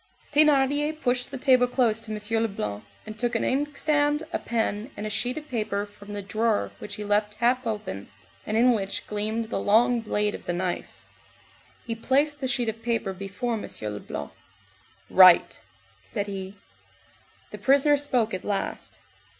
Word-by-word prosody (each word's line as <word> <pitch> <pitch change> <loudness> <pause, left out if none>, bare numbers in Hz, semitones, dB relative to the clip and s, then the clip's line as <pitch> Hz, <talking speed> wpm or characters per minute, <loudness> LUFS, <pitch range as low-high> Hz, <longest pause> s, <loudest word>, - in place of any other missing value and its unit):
Thénardier 295 +1 +3
pushed 250 -3 0
the 275 - -6
table 255 -1 +4
close 240 -3 +2
to 225 -1 -8
M. 215 +1 0
Leblanc, 105 - -3 0.2
and 215 0 -9
took 240 0 0
an 230 - +1
inkstand, 295 +2 +1
a - - 0
pen, 225 0 -2
and 210 - -4
a 215 - -3
sheet 245 +5 -2
of 305 0 -7
paper 210 -5 -2
from 205 0 -12
the 205 -1 -4
drawer 215 +2 0
which 205 - -7
he 210 - -6
left 210 0 +1
half 245 +1 +1
open, 210 - -4 0.3
and 215 - -1
in 245 +2 +5
which 200 -4 -2
gleamed 220 +2 -2
the - - -1
long 235 +3 +3
blade 210 -1 0
of - - -8
the 175 - 0
knife. 175 0 -4 0.8
He 230 - -3
placed 280 +6 +1
the 260 - 0
sheet 245 -2 0
of 220 +1 -3
paper 230 -4 -1
before 200 +6 -4
M. 220 - -3 0.3
Leblanc. 70 -8 -6 0.8
"Write," 185 -2 +6 0.4
said 95 - -4
he. 195 -1 -6 1.0
The - - -8
prisoner 280 +2 +4
spoke 255 -6 0
at 185 - -4
last. 200 -2 -3
225 Hz, 165 wpm, -26 LUFS, 205-255 Hz, 1.0 s, Write